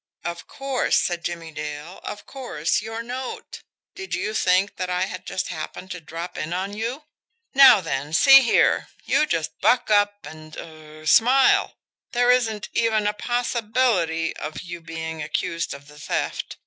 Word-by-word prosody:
"Of 170 0 -5
course," 270 -2 0
said 175 -1 -2
Jimmie 170 -2 -5
Dale. 150 +3 -7
"Of 205 - -7
course 190 - -2
your 225 +1 -5
note. 250 +2 -6 0.3
Did 380 -1 -5
you 215 - -3
think 190 0 +2
that 185 -1 -3
I 180 0 0
had - - -8
just 190 -1 -3
happened 180 +3 -7
to 180 -1 -6
drop 165 +3 -7
in 165 +3 -3
on 190 +3 -3
you? 235 +7 -4 0.5
Now, 265 -6 +8
then, 145 -3 -3
see 270 - +8
here, 235 - +3 0.2
you 305 - +2
just 165 - -2
buck 245 -3 +3
up, 205 0 +2
and 155 0 -11
er 155 -1 -11
smile. 255 - +4 0.4
There 245 0 +4
isn't 225 -5 +1
even 220 -2 +1
a 210 - +1
possibility 220 -8 0
of 155 - -6
you 175 -1 -8
being 160 -1 -6
accused 165 +2 -2
of 140 0 -8
the 150 0 -15
theft. 150 - -3
185 Hz, 160 wpm, -23 LUFS, 160-235 Hz, 0.5 s, Now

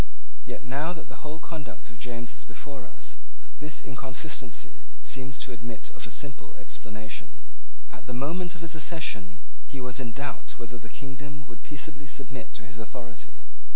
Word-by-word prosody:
Yet, - - -1
now 145 +7 +5
that 160 - -5
the - - -5
whole 150 +1 0
conduct 155 -8 -3
of 110 - -11
James 120 -1 +2
is 110 - -1
before 125 +2 -4
us, - - -5 0.4
this 150 0 +3
inconsistency 130 -2 +2 0.2
seems 135 0 +3
to - - -2
admit 115 -1 -2
of 110 - 0
a - - -5
simple 135 +5 +2
explanation. 110 0 -2 0.6
At - - -7
the 125 - +3
moment 175 +6 +4
of - - -6
his 165 - +1
accession 130 - +3 0.3
he 140 - -2
was 125 0 +2
in 120 - +3
doubt 140 +3 0
whether 120 0 -2
the 115 - -5
kingdom 140 +3 -3
would 115 -4 -8
peaceably 145 0 -1
submit 135 -2 -1
to 110 - -6
his 105 +2 -4
authority. 120 0 -4
130 Hz, 170 wpm, -35 LUFS, 115-145 Hz, 0.6 s, now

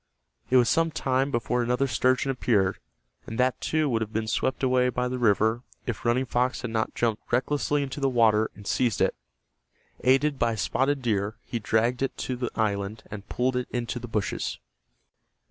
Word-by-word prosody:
It 130 - +5
was 120 -2 +5
some 165 +5 +3
time 135 -2 0
before 120 -1 0
another 125 +3 +1
sturgeon 130 +2 +1
appeared, 100 -7 +1 0.5
and 110 - -5
that, 125 -1 +1
too, 155 -1 +1
would 115 -4 0
have 110 -1 -3
been 110 0 -1
swept 130 +4 -1
away 125 -1 +3
by 125 0 -1
the 125 0 -3
river 110 +1 +3 0.2
if 120 - -4
Running 125 +2 +2
Fox 125 +1 0
had 120 - -3
not 110 -1 -1
jumped 115 -3 -1
recklessly 145 +3 +1
into 140 +1 -5
the 135 -1 +2
water 110 -3 +3
and 100 +1 -13
seized 120 +1 +1
it. - - +2 0.9
Aided 135 +2 +3
by 115 -1 +2
Spotted 135 +5 0
Deer 105 -2 0
he 120 - -3
dragged 115 +4 +1
it 135 - -1
to 130 - -3
the 125 -1 -3
island, 105 -1 -1
and 100 -1 -8
pulled 125 +1 0
it 125 0 -1
into 120 0 -3
the 120 - -7
bushes. 105 -3 -2
125 Hz, 185 wpm, -26 LUFS, 110-130 Hz, 0.9 s, It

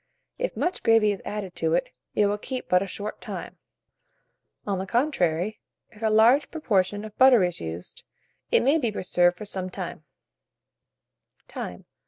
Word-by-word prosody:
If - - -2
much 360 - -1
gravy 225 -2 +4
is 200 - -5
added 200 -3 -5
to 160 0 +1
it, 175 - 0 0.3
it 210 - +4
will 205 +1 0
keep 255 +3 -5
but 180 0 +4
a 195 - -2
short 205 +3 -6
time; - - -7 1.1
on 195 -2 -1
the 190 - -4
contrary, 210 - 0 0.3
if 215 - -17
a 220 - +2
large 235 +7 +5
proportion 205 - 0
of 215 -1 -10
butter 255 -5 +7
is 175 -1 -2
used, 80 +2 -7 0.5
it - - +4
may 285 +6 +4
be 235 -6 0
preserved 180 -3 +2
for 210 - -7
some 190 -2 -4
time. 180 -4 -6
205 Hz, 160 wpm, -26 LUFS, 180-230 Hz, 1.1 s, butter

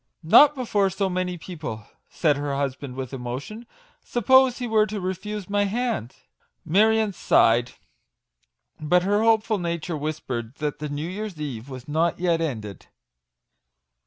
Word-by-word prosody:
" - - -48
Not 295 0 +8
before 210 -6 +1
so 190 +1 -1
many 180 0 -2
people/' 155 - -7 0.2
said 150 -4 +1
her 145 0 -3
hus 140 -2 -1
band 130 -2 -9
with 130 0 -6
emotion. 135 - -6 0.2
" - - -35
Suppose 260 +2 +5
he 245 - -4
were 215 -1 +3
to 215 -1 -4
refuse 190 +2 -4
my 205 0 +1
hand?" 220 - -2 0.5
Marion 215 +4 +3
sighed: 120 -6 +3 1.1
but 175 +4 +2
her 205 +3 +2
hopeful 220 -1 +2
nature 170 -1 -3
whispered 140 -6 -4
that 150 -1 -3
the 150 0 -4
New 145 +3 -4
Year's 195 -2 -6
Eve 135 -4 -6
was 130 -2 -9
not 160 +3 +1
yet 170 -2 +1
ended. 110 - -5
175 Hz, 155 wpm, -24 LUFS, 140-210 Hz, 1.1 s, Not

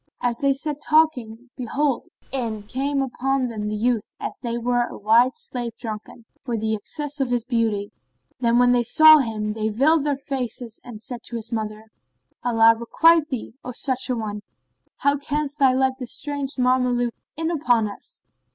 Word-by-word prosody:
As 240 -1 -1
they 275 -1 +2
sat 295 +1 -4
talking, 255 -7 +1
behold, 270 +2 -1 0.2
in 230 -5 -2
came 275 +5 -1
upon 265 0 -1
them 210 -2 -4
the 210 - -2
youth 230 0 -1
as - - -5
he 235 -2 -2
were 240 0 +1
a - - -9
white 230 +5 +3
slave 240 -2 -4
drunken[FN#31] 220 +1 -7 0.2
for 235 -2 -3
the 220 0 -1
excess 290 +7 -3
of 270 -2 0
his 245 -2 0
beauty; 225 -5 -1 0.5
and 235 0 +3
when 245 0 +5
they 245 -1 +3
saw 310 +6 +8
him, 215 -4 -2
they 220 0 -1
veiled 280 +8 +3
their 290 -2 0
faces 250 -4 -5
and 225 -3 -10
said 245 0 -7
to 240 - -5
his 230 0 -4
mother, 215 -1 -5 0.5
"Allah 230 -2 +5
requite 315 +7 +3
thee, 250 -4 -5
O 250 - -6
such 260 +1 0
an 250 - 0
one! 210 -2 -4 0.6
How 285 0 +2
canst 290 +1 -3
thou 265 -2 +5
let 260 0 +1
this 250 -2 -5
strange 285 -2 -3
Mameluke 250 -1 +1 0.2
in 325 +1 -1
upon 245 -9 +2
us? 200 - -11
245 Hz, 180 wpm, -23 LUFS, 225-275 Hz, 0.6 s, saw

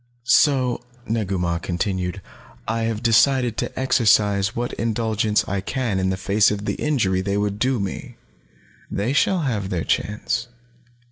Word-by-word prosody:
"So," 130 -2 +3 0.2
Negu 105 -4 -1
Mah 85 -1 -1
continued, 90 +1 -3 0.4
"I 115 +1 -1
have 115 0 -3
decided 120 +1 +3
to - - -3
exercise 105 -5 +3
what 120 +1 -3
indulgence 110 -2 0
I 100 -1 -2
can 115 -2 -2
in 95 0 0
the 95 - -1
face 100 +2 +3
of 105 0 -3
the - - -1
injury 105 -11 0
they 100 +1 -1
would 105 0 -1
do 130 +1 +1
me. 100 -1 -5 0.7
They 110 +7 -1
shall 180 +5 +2
have 105 -9 -2
their 90 -5 -2
chance." 105 +3 -1
105 Hz, 150 wpm, -22 LUFS, 100-120 Hz, 0.7 s, So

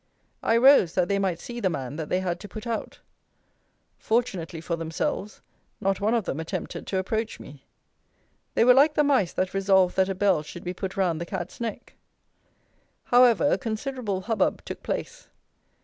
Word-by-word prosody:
I 225 - +3
rose, 245 - +6
that 180 -1 +1
they 200 0 +1
might 185 -4 -1
see 240 +4 -7
the 195 -5 +1
man 140 -4 -4
that 160 -2 -5
they 180 - +1
had 175 -2 -2
to 205 - -9
put 215 +5 -8
out. 230 -2 -4 1.0
Fortunately 195 -8 -1
for 170 +1 -3
themselves, 165 +5 -3 0.4
not 195 0 0
one 215 +3 +2
of 225 -5 0
them 145 - -3
attempted 160 - -5
to 190 - -1
approach 220 +4 -2
me. 140 -1 -13 0.9
They - - +4
were 250 - +8
like 290 +4 +5
the 300 - +4
mice 265 -11 +2
that 185 0 -1
resolved 190 -2 +3
that 190 0 +3
a 195 - -2
bell 190 -4 +2
should 165 +3 -10
be 180 - -3
put 190 +1 -5
round 175 -4 +1
the - - -3
cat's 185 +3 -6
neck! 230 -2 -5 1.1
However, 245 +2 +5
a - - +2
considerable 225 -4 -3
hubbub 215 -1 0
took - - -7
place. - - -5
195 Hz, 180 wpm, -26 LUFS, 175-230 Hz, 1.1 s, were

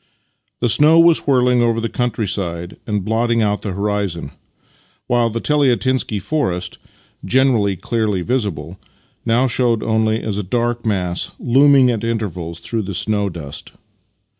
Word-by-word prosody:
The 120 - +2
snow 150 +7 +5
was 165 -2 +4
whirling 125 -2 +3
over 115 -1 +1
the 115 - -2
whole - - -14
country 120 -4 -1
side 85 -3 -4
and 105 -3 -2
blotting 115 +1 +1
out 105 -1 0
the 100 - -4
horizon, 100 -6 -2 0.7
while 120 -1 +2
the 115 +1 -3
Teliatinsky 130 -5 +1
forest 95 - -2 0.2
— - - -33 0.2
generally 115 -3 +2
clearly 105 -1 -1
visible 95 - -3 0.2
— - - -40
now 120 +3 +3
showed 120 -3 +1
only 110 0 0
as 105 -2 -2
a - - -2
dark 120 +3 -1
mass 90 -4 -1
looming 135 0 +4
at 115 -2 -3
intervals 90 -8 -3
through 115 +5 -3
the 100 -2 -5
snow 105 +1 0
dust. 80 -5 -8
110 Hz, 155 wpm, -18 LUFS, 100-120 Hz, 0.7 s, snow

